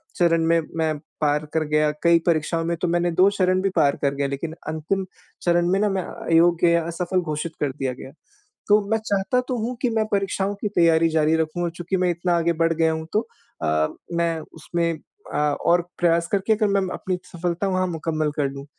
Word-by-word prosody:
चरण 165 -2 +3
में 165 0 +4 0.2
मैं 160 -2 0 0.2
पार 150 0 +1
कर 160 -1 +1
गया, 150 0 +2
कई 170 0 +5
परीक्षाओं 165 0 +1
में 170 - 0
तो 180 - +1
मैंने 175 0 +1
2 185 +4 +5
चरण 185 -2 +1
भी 195 - +1
पार 140 -1 +3
कर 140 -1 +1
गया, 140 0 0
लेकिन 150 +4 -4
अंतिम 160 +5 -2 0.4
चरण 175 0 +2
में 195 - +2
ना, 210 0 +2
मैं 190 -1 -1
अ, - - -9
अयोग्य 170 +1 +4
या 170 0 +3
असफल 180 +2 -1
घोषित 155 0 -3
कर 145 -2 0
दिया 130 -1 -3
गया। 130 +2 -10 0.6
तो 210 +1 +5
मैं 220 - +4
चाहता 200 +5 +1
तो 250 - 0
हूँ 245 +2 -3
कि 250 - +2
मैं 220 -1 +1
परीक्षाओं 195 0 0
की 210 - -1
तैयारी 165 -1 +4
जारी 155 0 +2
रखूँ, 160 +2 -1
और 170 - -1
चूँकि 175 +2 -3
मैं 180 -1 +1
इतना 175 0 0
आगे 170 0 +1
बढ़ 165 0 +3
गया 160 0 +2
हूँ, 160 0 -4
तो 225 +2 +1 0.4
अ, 75 0 +2 0.3
मैं 170 -1 0
उसमें 170 +1 -2 0.4
अ, - - -1
और 150 +4 +2 0.2
प्रयास 170 -1 +2
करके, 200 +3 +2
अगर 215 -1 +1
मैं 200 -1 +2
म 185 - -2
अपनी 185 -1 -3 0.2
सफलता 175 +3 -2
वहाँ 185 -1 +1
मुकम्मल 155 -2 -2
कर 145 - +1
लूँ। 140 0 -8
170 Hz, 215 wpm, -23 LUFS, 160-185 Hz, 0.6 s, कई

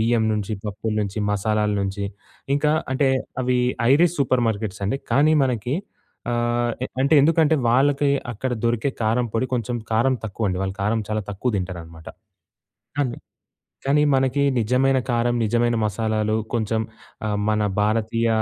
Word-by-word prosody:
బియ్యం 115 0 +2
నుంచి, 105 0 -2
పప్పుల 105 +1 -3
నుంచి 100 +1 -3
మసాలాల 105 +1 +1
నుంచి, 100 +1 -2 0.5
ఇంకా 150 +1 +2 0.2
అంటే 135 0 +2 0.3
అవి 125 0 +1 0.3
ఐరిష్ 170 +3 +4
సూపర్ 130 -3 +2
మార్కెట్స్ 100 -2 -3
అండి. 135 +7 -1
కానీ, 155 +3 +4
మనకి 125 +1 -1 0.6
ఆహ్, 120 0 0
ఎ - - -1
అంటే 140 +3 +3
ఎందుకంటే, 160 +1 +4
వాళ్ళకి 140 +3 +3 0.2
అక్కడ 125 +4 -3
దొరికే 120 +3 +1
కారం 115 +3 +1
పొడి 115 +3 +1
కొంచెం 120 0 -2 0.2
కారం 120 +4 +3
తక్కువండి, 100 -3 -2
వాళ్ళు 95 0 -2
కారం 110 +2 +1
చాలా 110 0 -1
తక్కువ 100 +6 -1
దింటారనమాట. 85 -3 -6 0.9
అన్ 130 -4 0 0.7
కానీ, 145 +2 +3
మనకి 135 +1 +2 0.2
నిజమైన 130 +4 +2
కారం, 120 0 +1
నిజమైన 120 +2 +1
మసాలాలు 110 +1 0 0.2
కొంచెం 110 -1 0 0.5
ఆహ్, 105 -1 -1
మన 110 0 +1 0.2
భారతీయ 115 +2 +1
115 Hz, 140 wpm, -23 LUFS, 105-130 Hz, 0.9 s, ఐరిష్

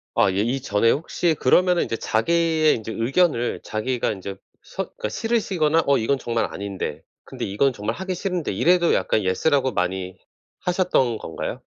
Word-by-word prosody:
아 95 - +4
예. 95 - -3
이 125 +5 -1
전에 115 -1 +2
혹시 165 +2 0
그러면은 180 +6 +4
인제 115 - -3
자기의 160 +7 +2
인제 110 -1 -6
의견을 125 +1 +1
자기가 120 +3 -1
인제 100 -1 -6 0.3
서 - - -4
그러니까 105 - -6
싫으시거나 170 - +1
'어 140 - +4
이건 125 +5 +1
정말 115 -2 -1
아닌데. 95 -6 -5 0.2
근데 - - -5
이건 125 +8 +1
정말 105 0 -3
하기 190 0 -4
싫은데.' 180 - -2
이래도 175 - +3
약간 110 - +1
"Yes." 95 +10 0
라고 135 -3 +2
많이 90 -1 -2 0.4
하셨던 175 - +1
건가요? 80 - -6
125 Hz, 375 characters per minute, -23 LUFS, 105-170 Hz, 0.4 s, 아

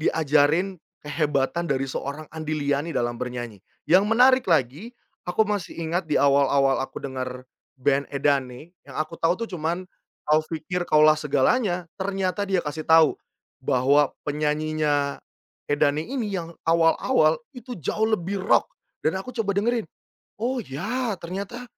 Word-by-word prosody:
diajarin 160 +4 +2 0.2
kehebatan 150 +2 -1
dari 135 -1 0
seorang 140 +4 -5
Andy 155 -1 -3
Liany 145 +3 -1
dalam 120 0 -1
bernyanyi. 120 -5 -5 0.2
Yang 185 +4 +5
menarik 255 +3 +5
lagi 160 - 0 0.3
aku 175 +5 +2
masih 205 -4 -3
ingat 170 +2 -1
di 150 - +1
awal-awal 140 -1 +3
aku 135 - -6
dengar 130 -2 -5 0.3
band 140 +1 +1
Edane 140 +1 -1 0.2
yang - - -10
aku 155 +2 -3
tahu 165 +2 +2
cuman 175 -1 -3 0.4
"Kau 155 +1 +4
Pikir 175 +2 -3
Kaulah 155 0 +5
Segalanya" 175 - +1
ternyata 195 +1 -1
dia 190 -2 +1
kasih 150 +1 -5
tahu, 160 -2 +5 0.4
bahwa 135 +3 +2
penyanyinya 150 -1 0 0.5
Edane 145 +1 +2
ini 240 -5 -3
yang 170 -3 -4
awal-awal 165 +1 +3 0.2
itu 250 -1 -8
jauh 215 +7 -1
lebih 200 -2 -1
rock, 190 - +2 0.3
dan 160 +5 +1
aku 245 +6 -8
coba 225 -4 -1
dengerin, 230 +2 +1 0.5
"Oh, 245 +3 -1
ya 215 - -3
ternyata 195 +8 -6
160 Hz, 135 wpm, -24 LUFS, 145-195 Hz, 0.5 s, Yang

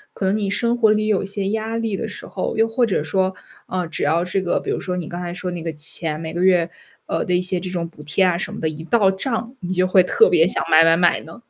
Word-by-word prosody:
可 195 - -3
能 190 +2 +2
你 205 -2 -1
生 235 +3 +1
活 225 -3 +4
里 215 0 +1
有 200 -2 +1
些 195 0 -3
压 220 +1 -2
力 225 -3 -2
的 225 +2 -4
时 205 - -9
候， 190 - -4
又 225 0 +3
或 235 +1 +1
者 180 -7 0
说， 185 +4 0 0.3
呃， 180 -2 -2
只 160 - -5
要 165 +4 +1
这 185 +2 -1
个 175 - 0
比 - - -4
如 - - -1
说 180 -1 -3
你 170 -3 -4
刚 175 +1 -6
才 175 -1 -4
说 180 0 -4
那 175 - -5
个 165 0 -3
钱， 155 +1 +1
每 160 0 -6
个 175 +1 -1
月， 180 -3 +4 0.4
呃， - - -1
的 180 - 0
一 - - +3
些 180 0 -1
这 180 +1 -6
种 170 -2 -3
补 160 -2 -15
贴 150 +6 +1
啊 180 -2 +2
什 175 - -4
么 - - -7
的， 160 - -1
一 155 +1 -6
到 200 -1 +3
账， 230 +4 -3
你 180 -1 -5
就 185 0 +2
会 185 0 +5
特 180 - +4
别 165 -1 +4
想 - - 0
买 160 +1 +7
买 165 0 +4
买 175 -1 +3
呢？ 160 - -12
185 Hz, 315 characters per minute, -21 LUFS, 170-205 Hz, 0.4 s, 买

